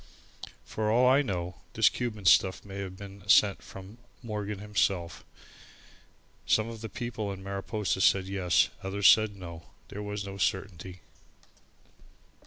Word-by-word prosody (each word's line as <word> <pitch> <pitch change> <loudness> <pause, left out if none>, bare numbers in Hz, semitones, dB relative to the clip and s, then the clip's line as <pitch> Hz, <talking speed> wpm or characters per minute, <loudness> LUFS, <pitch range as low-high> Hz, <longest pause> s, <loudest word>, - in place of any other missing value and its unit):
For 110 -1 -2
all 125 +3 +4
I 135 +3 +5
know, 90 -8 -4 0.2
this - - +4
Cuban 110 -5 -2
stuff 95 +2 +4
may 100 -1 -7
have 95 -1 -6
been 100 0 -10
sent 100 +1 +5
from 95 +4 -12 0.2
Morgan 105 -2 -4
himself. 95 -4 -1 1.2
Some 110 0 +3
of 115 -1 -9
the 110 - -6
people 110 -2 -4
in 95 -1 -8
Mariposa 100 -1 -2
said 95 -1 +4
yes, 95 -3 +2
others 95 +1 +2
said 110 -2 +5
no. 85 -3 -9 0.2
There 105 - -7
was 105 0 -4
no 100 0 -7
certainty. 95 -2 -3
100 Hz, 140 wpm, -29 LUFS, 95-105 Hz, 1.2 s, I